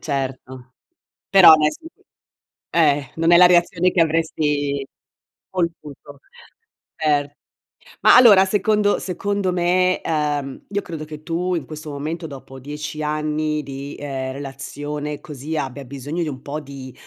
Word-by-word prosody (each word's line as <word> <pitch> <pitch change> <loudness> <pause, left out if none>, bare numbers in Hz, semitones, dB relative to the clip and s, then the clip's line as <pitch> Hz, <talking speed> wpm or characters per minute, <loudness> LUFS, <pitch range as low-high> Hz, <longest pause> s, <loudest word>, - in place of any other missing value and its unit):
certo. 130 -2 -5 0.5
Però 190 -5 +9
dai 150 0 +2
s - - -10 1.0
eh, 145 -5 +2
non 165 +1 +2
è - - +9
la 180 +1 +8
reazione 180 0 +3
che 175 - +1
avresti 150 -3 0 0.6
voluto. 150 -5 -5 0.8
Cer 145 -2 0 0.7
ma - - +7
allora, 210 -6 +8
secondo 205 +1 +1
secondo 195 0 -2
me, 180 +1 +2
uhm, 145 -3 -2
io 200 +1 -2
credo 160 -3 -7
che 155 0 -10
tu 180 +2 -1
in 165 - -3
questo 155 0 -9
momento, 160 +4 -5
dopo 135 -1 -11
10 150 +3 -6
anni 150 0 -1
di, 140 +1 -7
ehm, 135 -2 -4
relazione 145 +2 -6
così, 150 -1 -7
abbia 135 -1 -4
bisogno 140 +6 -5
di - - -3
un 130 -2 -8
po' 150 +2 -5
di 135 -3 -10
150 Hz, 135 wpm, -21 LUFS, 140-170 Hz, 1.0 s, Però